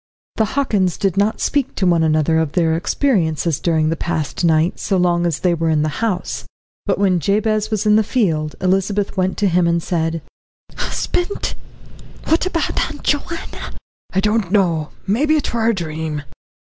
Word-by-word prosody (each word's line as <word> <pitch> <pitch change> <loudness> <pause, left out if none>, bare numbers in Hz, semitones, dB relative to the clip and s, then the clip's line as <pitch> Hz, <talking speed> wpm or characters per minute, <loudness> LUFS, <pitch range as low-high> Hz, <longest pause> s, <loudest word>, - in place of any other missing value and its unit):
The 220 - +3
Hockins 200 - +1
did 195 -3 0
not 205 +2 +1
speak 280 -3 0
to 195 - 0
one 170 -2 +3
another 160 0 +2
of 160 -3 -1
their 165 -3 +2
experiences 165 - 0
during 160 -2 +1
the 165 - 0
past 160 -1 -3
night, 165 +1 +2
so 195 - 0
long 175 -1 +2
as 165 - -2
they 180 -2 +3
were 165 -1 0
in 155 -1 +2
the 155 +6 -3
house, 205 -6 -2 0.4
but - - +1
when 190 -3 +2
Jabez 215 +4 +1
was 215 -1 -1
in 210 0 +5
the 220 - +4
field, 165 - 0
Elizabeth 195 +2 0
went 185 -1 0
to 205 - +2
him 175 -1 +2
and 170 -1 +1
said: 165 -2 -1 0.5
"Husband, 355 +3 -2 0.7
what 330 +3 +1
about 335 -3 0
Aunt - - -9
Joanna?" 310 +3 -3 0.4
"I 190 - +1
don't 210 -3 +1
know 170 -7 +2 0.2
maybe 285 +10 +2
it 295 - -1
were 230 -1 +1
a 230 - +2
dream." 155 -3 -4
180 Hz, 175 wpm, -19 LUFS, 160-215 Hz, 0.7 s, in